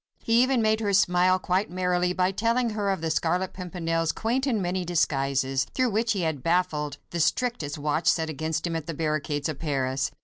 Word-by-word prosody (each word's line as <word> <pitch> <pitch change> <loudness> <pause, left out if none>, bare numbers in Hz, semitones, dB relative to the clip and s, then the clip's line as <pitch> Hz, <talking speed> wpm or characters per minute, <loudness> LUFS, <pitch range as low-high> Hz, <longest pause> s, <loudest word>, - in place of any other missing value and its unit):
He 230 +1 +4
even 255 -2 +2
made 215 0 +2
her 205 -2 -1
smile 185 -1 +4
quite 185 +2 0
merrily 180 0 0
by 185 +1 +1
telling 230 +4 +1
her 210 -2 -1
of 190 -4 -1
the 165 -1 -1
Scarlet 180 +4 0
Pimpernel's 165 -3 -2
quaint 250 +5 -1
and 235 -5 +1
many 180 0 -1
disguises, 135 -5 0
through 255 -2 +2
which 225 +2 +1
he 195 - -2
had 160 -5 -1
baffled 155 -3 0
the 170 - -3
strictest 165 - 0
watch 150 +2 -1
set 160 -1 +3
against 155 +1 -3
him 170 -1 -2
at 160 -2 -4
the 165 - -4
barricades 150 -2 -1
of 155 -3 -5
Paris. 135 -3 -1
175 Hz, 200 wpm, -26 LUFS, 155-200 Hz, -, He